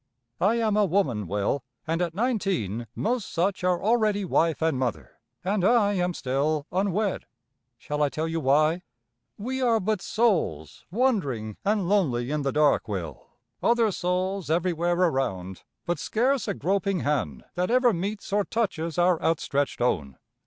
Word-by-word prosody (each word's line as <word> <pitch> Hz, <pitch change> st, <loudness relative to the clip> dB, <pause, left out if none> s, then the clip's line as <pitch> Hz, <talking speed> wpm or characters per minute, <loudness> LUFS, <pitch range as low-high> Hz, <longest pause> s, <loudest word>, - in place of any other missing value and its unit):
"I 205 Hz, +5 st, +3 dB
am 220 Hz, -3 st, +1 dB
a 210 Hz, -1 st, +4 dB
woman, 145 Hz, -, 0 dB
Will, 105 Hz, +8 st, -1 dB, 0.2 s
and 165 Hz, +2 st, -1 dB
at 170 Hz, -2 st, -1 dB
nineteen 190 Hz, -, -1 dB
most 235 Hz, -1 st, -1 dB
such 185 Hz, +3 st, 0 dB
are 180 Hz, -1 st, +1 dB
already 215 Hz, -2 st, +2 dB
wife 165 Hz, -2 st, +1 dB
and 160 Hz, -5 st, +1 dB
mother, 105 Hz, -, -3 dB, 0.2 s
and 195 Hz, 0 st, 0 dB
I 210 Hz, -1 st, +4 dB
am 180 Hz, -2 st, 0 dB
still 145 Hz, +3 st, 0 dB
unwed. 195 Hz, +2 st, 0 dB, 0.5 s
Shall 150 Hz, +4 st, -4 dB
I 145 Hz, -, +3 dB
tell 155 Hz, +4 st, -2 dB
you 165 Hz, 0 st, -2 dB
why? 155 Hz, +4 st, +3 dB, 0.6 s
We 260 Hz, +5 st, -3 dB
are 235 Hz, -3 st, +3 dB
but 210 Hz, -1 st, -1 dB
souls 170 Hz, -, 0 dB
wandering 165 Hz, -, 0 dB
and 205 Hz, -2 st, +1 dB
lonely 140 Hz, -11 st, +1 dB
in 150 Hz, 0 st, 0 dB
the 140 Hz, -1 st, 0 dB
dark, 150 Hz, -1 st, +3 dB
Will, 90 Hz, -7 st, -5 dB, 0.3 s
other 230 Hz, -2 st, +3 dB
souls 185 Hz, 0 st, -2 dB
everywhere 175 Hz, +1 st, +1 dB
around, 130 Hz, -, -1 dB, 0.2 s
but 175 Hz, -3 st, -1 dB
scarce 250 Hz, -, 0 dB
a 200 Hz, -, -1 dB
groping 195 Hz, +2 st, 0 dB
hand 130 Hz, -, -1 dB
that 180 Hz, +1 st, -1 dB
ever 245 Hz, -1 st, +4 dB
meets 200 Hz, +3 st, -4 dB
or 205 Hz, 0 st, +3 dB
touches 180 Hz, -8 st, -2 dB
our 175 Hz, -1 st, +3 dB
outstretched 145 Hz, -5 st, 0 dB
own. 75 Hz, -, 0 dB
175 Hz, 155 wpm, -26 LUFS, 140-205 Hz, 0.6 s, a